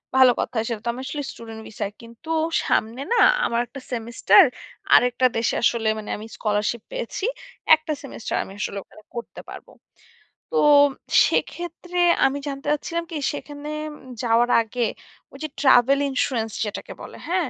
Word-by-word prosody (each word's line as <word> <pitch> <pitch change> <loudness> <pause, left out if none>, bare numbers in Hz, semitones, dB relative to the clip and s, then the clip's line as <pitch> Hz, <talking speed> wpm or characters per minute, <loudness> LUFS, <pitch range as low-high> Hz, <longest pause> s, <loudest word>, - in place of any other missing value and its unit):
ভালো 260 -1 +7
কথা - - -3
সেটা 230 -3 -3
তো - - 0
আমি 250 - -7
আসলে 290 +1 -4
স্টুডেন্ট 225 -1 -10
ভিসায়। 210 -2 -4
কিন্তু 235 +7 -14 0.3
সামনে 230 +4 0
না - - +2 0.3
আমার 235 - 0
একটা 275 - -10
সেমিস্টার 235 - +5 0.5
আরেকটা 245 +1 +4
দেশে 230 - 0
আসলে 230 -2 +2
মানে 215 - -7
আমি 210 - -8
স্কলারশিপ 210 +2 -1
পেয়েছি। - - -4 0.5
একটা 315 0 -7
সেমিস্টার 275 -5 -5
আমি 195 - -11
আসলে 200 - -3
ওখানে 215 - -18
করতে 235 - -7
পারব। - - -10 0.8
তো 475 - 0 0.7
সেক্ষেত্রে 350 +1 -3 0.3
আমি 270 +1 +1
জানতে 275 0 -5
চাচ্ছিলাম 335 +3 -2
কি - - -5 0.2
সেখানে 290 0 -7 0.5
যাওয়ার 240 +1 +3
আগে 230 +2 -5 0.5
ওই - - -10
যে 310 - -3
ট্রাভেল 265 0 +5
ইন্সুরেন্স 245 -4 -1
যেটাকে 210 - -6
বলে। - - -10
হ্যাঁ। 350 -5 0
245 Hz, 150 wpm, -23 LUFS, 225-290 Hz, 0.8 s, ভালো